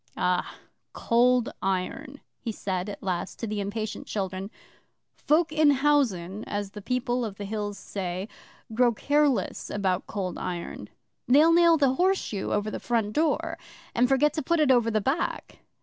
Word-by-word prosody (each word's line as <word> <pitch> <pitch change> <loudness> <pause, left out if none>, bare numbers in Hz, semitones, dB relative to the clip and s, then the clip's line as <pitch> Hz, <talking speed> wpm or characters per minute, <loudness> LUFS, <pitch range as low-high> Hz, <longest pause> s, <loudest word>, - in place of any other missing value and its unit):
'AH 180 0 0 0.4
Cold 245 +1 +2
Iron,' 195 +9 -3 0.2
he 235 - -4
said 190 -2 -3
at 205 - -8
last 185 -1 -3
to - - -4
the 215 -1 -3
impatient 210 +2 -4
children. 190 -1 -3 0.6
'Folk 315 +2 +1
in 310 -1 +4
housen, 255 -10 +1
as 205 -1 -4
the 210 - -9
People 250 +2 -1
of 215 -4 -4
the 205 - -5
Hills 205 0 -4
say, 190 -1 -4 0.5
grow 240 +1 +3
careless 290 +3 +1
about 190 -2 -1
Cold 190 -4 -4
Iron. 175 -2 -5 0.4
They'll 300 +6 +6
nail 340 -1 +6
the 275 -3 +3
Horseshoe 360 - 0
over 210 +1 0
the - - -4
front 225 -3 -1
door, 310 +3 0 0.3
and 245 +1 +3
forget 280 +2 +3
to 310 - -2
put 335 +4 +1
it 295 -3 +4
over 240 -3 +4
the 215 -1 +1
back. 270 +10 -2
225 Hz, 160 wpm, -27 LUFS, 195-275 Hz, 0.6 s, They'll